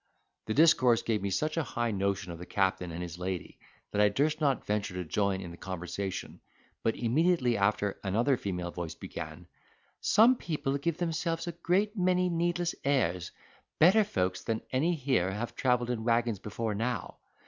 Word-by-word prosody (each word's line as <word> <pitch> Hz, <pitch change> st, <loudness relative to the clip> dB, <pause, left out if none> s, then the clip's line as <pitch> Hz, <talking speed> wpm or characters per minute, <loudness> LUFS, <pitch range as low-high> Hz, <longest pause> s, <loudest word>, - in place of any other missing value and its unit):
The 110 Hz, -, -1 dB
discourse 130 Hz, -6 st, +5 dB
gave 110 Hz, -3 st, 0 dB
me 100 Hz, -, -1 dB
such 155 Hz, -, -1 dB
a 165 Hz, -, +2 dB
high 120 Hz, -4 st, -2 dB
notion 100 Hz, -2 st, -1 dB
of 85 Hz, -, -8 dB
the 90 Hz, -, -7 dB
captain 95 Hz, -2 st, 0 dB
and 85 Hz, +2 st, -4 dB
his 85 Hz, 0 st, -7 dB
lady 90 Hz, -1 st, -4 dB, 0.3 s
that 105 Hz, -, +1 dB
I 105 Hz, -, +6 dB
durst 150 Hz, +9 st, 0 dB
not 140 Hz, -3 st, +1 dB
venture 105 Hz, -3 st, -1 dB
to 90 Hz, -, -2 dB
join 95 Hz, +3 st, 0 dB
in 90 Hz, -3 st, -7 dB
the 85 Hz, -, -10 dB
conversation; 95 Hz, +1 st, -5 dB, 0.4 s
but 115 Hz, -, +1 dB
immediately 130 Hz, +1 st, +2 dB
after 100 Hz, 0 st, +1 dB
another 115 Hz, +8 st, +2 dB
female 90 Hz, -6 st, -4 dB
voice 85 Hz, -2 st, -5 dB
began: -, -, -7 dB, 0.5 s
"Some 240 Hz, +4 st, +5 dB
people 150 Hz, -7 st, -2 dB
give 165 Hz, +2 st, -1 dB
themselves 165 Hz, -1 st, -1 dB
a 170 Hz, -, -3 dB
great 190 Hz, +6 st, 0 dB
many 180 Hz, -1 st, +2 dB
needless 175 Hz, 0 st, 0 dB
airs; 115 Hz, -, +1 dB, 0.5 s
better 190 Hz, +7 st, +6 dB
folks 95 Hz, -, -1 dB
than 110 Hz, -1 st, -1 dB
any 160 Hz, +7 st, +2 dB
here 130 Hz, -, +1 dB
have 105 Hz, +5 st, -4 dB
travelled 125 Hz, -1 st, +1 dB
in 115 Hz, -2 st, -3 dB
waggons 115 Hz, -2 st, +1 dB
before 110 Hz, +2 st, -3 dB
now. 115 Hz, 0 st, -3 dB
115 Hz, 175 wpm, -30 LUFS, 95-155 Hz, 0.5 s, I